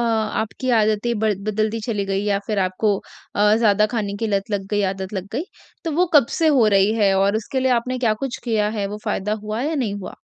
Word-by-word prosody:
आपकी 225 +1 -1
आदतें 220 0 +2
बद 215 -3 +1
बदलती 215 +1 0
चली 205 -4 -1
गई 195 0 -1
या 200 -1 +1
फिर 215 -2 -1
आपको 190 +3 +1 0.4
अ, 210 +1 +4
ज़्यादा 215 -2 +3
खाने 210 -4 -3
की 225 - -2
लत 200 -1 -1
लग 200 -2 -2
गई, 205 -1 +1
आदत 190 +1 -7
लग 190 -2 -4
गई। 300 - -1 0.4
तो 330 - -1
वो 355 +4 +2
कब 285 -5 +7
से 325 - +3
हो 260 -7 +4
रही 200 +1 +4
है? 205 -3 +3
और 200 +2 +2
उसके 245 +4 -2
लिए 260 0 +2
आपने 250 +2 0
क्या 230 -3 +2
कुछ 260 - -3
किया 215 -3 +1
है? 200 - 0
वो 210 +1 -6
फ़ायदा 210 -1 -1
हुआ 215 +2 -3
या 315 +3 -1
नहीं 235 -8 -1
हुआ? 200 -2 -7
215 Hz, 235 wpm, -21 LUFS, 200-235 Hz, 0.4 s, कब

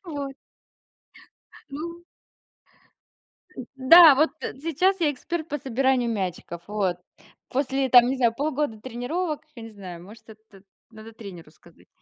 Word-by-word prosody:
Вот. 280 -1 -5 1.4
Ну. 335 +4 -7 1.7
Да, 295 +3 +8
вот, 305 +3 +3
э, - - -4
сейчас 360 +5 +1
я 305 -3 +2
эксперт 315 +4 -5
по 295 - -3
собиранию 260 -2 0
мячиков, 180 -4 -5
вот. 195 -4 -1 0.5
После, 270 0 -1
там, 245 -1 +7
не 265 - -2
знаю, 235 -3 +2
полгода 290 -5 -2
тренировок, 290 +7 -4
я 230 - -10
не 225 - -9
знаю, 185 -5 -10
может, 210 +5 -15
это 215 -3 -17 0.3
надо 220 0 -12
тренеру 185 -8 -11
сказать. 170 +1 -22
255 Hz, 130 wpm, -24 LUFS, 215-295 Hz, 1.7 s, Да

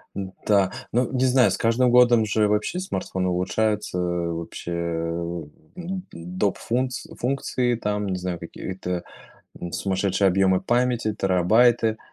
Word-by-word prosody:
Н-да. 95 0 0 0.2
Но 125 +1 +2
не 130 0 +1
знаю, 125 -4 +5
с - - -1
каждым 120 +2 +2
годом 120 -2 +5
же 105 0 +2
вообще 105 - 0
смартфоны 95 - -2
улучшаются. 95 +3 0
Вообще, 85 -1 -3
а, 85 0 -2
у 85 -3 -5 0.3
м, 185 +1 -5
доп 90 +4 -2
фунц 125 +1 -2
функции, 125 -1 0
там, 105 -2 -2
не 95 - -1
знаю, 90 -1 -3
какие-то, 90 +1 -5 0.6
м, 85 -1 -6
сумасшедшие 95 0 +1
объемы 95 0 +3
памяти, 120 -3 +1
терабайты. 110 +5 +3
100 Hz, 135 wpm, -24 LUFS, 90-120 Hz, 0.6 s, знаю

